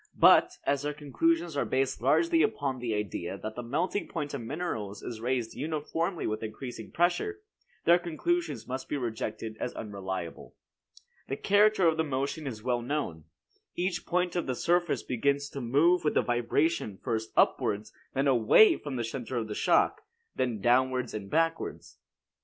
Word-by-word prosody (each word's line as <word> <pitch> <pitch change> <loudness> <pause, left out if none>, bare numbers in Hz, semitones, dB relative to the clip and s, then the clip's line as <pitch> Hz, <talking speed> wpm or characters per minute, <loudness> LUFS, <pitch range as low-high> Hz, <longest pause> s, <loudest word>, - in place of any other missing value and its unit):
But, - - +6
as 140 -1 +1
their 145 0 -3
conclusions 165 +4 0
are 140 - +1
based 130 -2 0
largely 330 - +3
upon 140 -11 0
the 120 -3 -2
idea 100 -2 -3
that 110 +2 -6
the 125 - -4
melting 160 +12 -1
point 145 -1 -4
of 140 - -3
minerals 115 - -4
is 110 -2 -6
raised 120 -2 -1
uniformly 160 +4 -2
with 110 0 -2
increasing 115 +1 -7
pressure, 180 - 0 0.4
their 175 +1 +6
conclusions 335 - -2
must 130 +1 -5
be 145 - -1
rejected 110 -2 -4
as 125 - -3
unreliable. 95 -5 -6 0.7
The 135 - -3
character 205 -2 +4
of 160 -1 +2
the 160 - +2
motion 140 +1 -2
is 110 -5 -6
well 120 -1 0
known. 120 - -3 0.5
Each 175 0 -1
point 180 0 0
of 175 - -1
the 130 - -1
surface 175 -3 +1
begins 140 +3 0
to 140 - -5
move 150 +9 +3
with 150 - +1
the - - +4
vibration 120 - 0
first 110 -2 -3
upwards, 105 +1 +2 0.2
then 135 +2 +2
away 135 - +6
from 145 -3 -6
the 120 - -1
center 120 +2 -4
of 110 -2 -3
shock, - - +2 0.3
then 120 -5 -1
downward 125 +1 +2
and 100 -2 -6
backwards. 165 +3 -1
135 Hz, 165 wpm, -29 LUFS, 115-165 Hz, 0.7 s, But